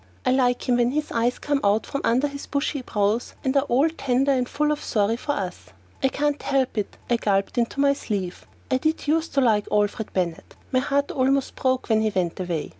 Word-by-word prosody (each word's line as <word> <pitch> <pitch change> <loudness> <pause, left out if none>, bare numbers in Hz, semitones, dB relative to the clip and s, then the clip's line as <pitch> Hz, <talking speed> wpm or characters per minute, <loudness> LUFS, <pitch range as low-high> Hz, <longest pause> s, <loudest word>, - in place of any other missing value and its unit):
I 255 - +3
like 250 -1 +2
him 245 -1 +3
when 240 +1 +2
his 300 0 -2
eyes 235 +2 +1
come 290 -1 0
out 205 +2 +2
from 275 - -4
under 255 +5 +2
his 280 0 -8
bushy 280 0 -1
brows 210 0 -1
and 265 +1 0
are 275 0 +3
all 265 +6 +4
tender 275 -4 +1
and 255 -2 +1
full 300 0 +1
of 300 - -2
sorry 215 +1 +1
for 290 +4 -2
us. 180 - -4 0.4
"I - - +4
can't 290 +2 -1
help 270 -2 0
it," 210 -2 -3
I 240 - +2
gulped 200 +2 0
in 235 - +2
my 280 0 +4
sleeve. 200 -9 -4 0.2
"I 260 - +4
did 315 +4 -1
use 320 +2 +1
to 275 - 0
like 215 -5 +2
Alfred 210 +1 0
Bennett. 175 -3 -3 0.2
My 255 - +3
heart 280 +1 0
almost 270 +1 +1
broke 260 -1 0
when 220 -2 +3
he 220 - +2
went 175 -2 -1
away. 175 -4 -2
255 Hz, 220 wpm, -24 LUFS, 215-280 Hz, 0.4 s, all